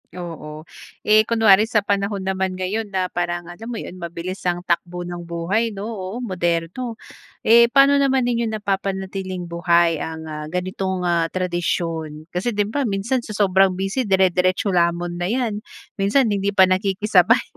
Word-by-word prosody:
Oo. 160 -3 -7 0.4
Eh, 215 0 +4
kunwari 220 -2 +5
sa 220 -3 +1
panahon 200 -1 -1
naman 190 0 -1
ngayon 195 +4 -2
na 190 -2 -2
parang 175 0 -2
alam 220 +6 -10
mo 240 - -4
yun 185 -4 -7
mabilis 170 +2 -5
ang 175 0 -1
takbo 175 0 -1
ng 175 0 -6
buhay 200 +7 -1
no, 195 - -6
oo 190 -2 -6
moderno, 180 +4 -2 0.5
eh, 235 +1 +7
pa'no 275 +3 +5
naman 270 -2 +2
ninyo 235 -1 0
napapanatiling 195 -3 -3
buhay 170 -1 +2
ang, 160 0 -5
ah, 150 -1 -6
ganitong, 185 +2 -3
ah, 170 -2 +1
tradisyon? 165 -3 -2
Kasi 200 +6 -2
di 205 - +2
ba 265 +4 -1
minsan 210 +6 0
sa 215 - -7
sobrang 190 -2 +3
busy 195 +6 -2
dere-deretso 185 0 +2
lamon 175 0 0
na 175 - -1
yan, 225 -1 -1 0.4
minsan 215 +4 +3
hindi 200 0 -1
pa 190 - +7
nakikisabay 195 +3 +3
190 Hz, 155 wpm, -21 LUFS, 175-215 Hz, 0.5 s, eh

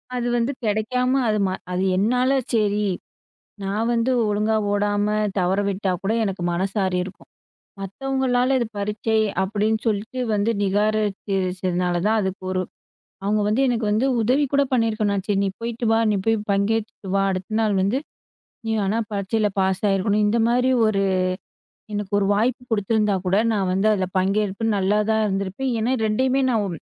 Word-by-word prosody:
அது 245 -1 -1
வந்து 235 +3 0
கெடைக்காம, 225 +4 0 0.2
அது 215 -1 +1
ம - - -1 0.2
அது 180 +1 0
என்னால 250 +6 +2 0.2
"சேரி, 210 -2 +1 0.8
நான் 205 +4 -1
வந்து 235 +2 +1 0.2
ஒழுங்கா 210 +1 +1 0.2
ஓடாம 205 0 +1 0.3
தவற 185 +1 +1
விட்டா 195 0 -1
கூட 200 +2 0
எனக்கு 195 -3 -3
மனசாரியிருக்கும்" 190 0 -2 0.5
மத்தவங்களால 260 +4 0
"இது 240 - -1
பரீட்சை" 210 +2 -1 0.2
அப்படின்னு 210 +3 0
சொல்லிட்டு 220 +4 -1
வந்து 205 +2 +1
நிராகரிச்சதுனால 195 -3 0
தான், 220 +1 +2
அதுக்கு 190 0 -4
ஒரு 185 0 0 0.6
அவங்க 210 +1 +1
வந்து 215 +5 +1
எனக்கு 235 -3 0
வந்து 220 +5 +2 0.2
உதவி 260 +6 +2
கூட 280 0 +4
பண்ணியிருக்க 225 -3 +1
வேணாம், 200 - +1
"நான் 195 -1 -3
சரி, 205 -2 +1
நீ - - 0
போய்ட்டு 235 +1 -3
வா. - - +4
நீ - - +1
போய் 225 0 +3
பங்கேத்திட்டு 210 0 -1
வா. 195 - +3
அடுத்த 190 +3 -4
நாள் 215 -2 +1
வந்து 200 +7 +1 0.7
நீ - - -1
வேணா 200 +3 0
பரீட்சையில 205 +2 0
பாஸ் 190 0 0
ஆயிருக்கணும்" 200 +2 +1
இந்தமாரி 235 +4 +2 0.2
ஒரு 200 -2 +1 0.9
எனக்கு 205 -1 -4
ஒரு 200 - +1
வாய்ப்பு 240 +4 0
கொடுத்துருந்தா 210 -1 +1
கூட 185 +2 +2 0.2
நான் 195 -3 0
வந்து 195 +3 +2
அதில 190 -3 0
பங்கேற்று 200 +3 0
நல்லாதான் 210 +3 +1
இருந்திருப்பேன், 200 +6 -2
ஏன்னா, 235 +4 +1
ரெண்டையுமே 260 +5 +1
நான் 205 -7 -1
210 Hz, 150 wpm, -22 LUFS, 195-225 Hz, 0.9 s, கூட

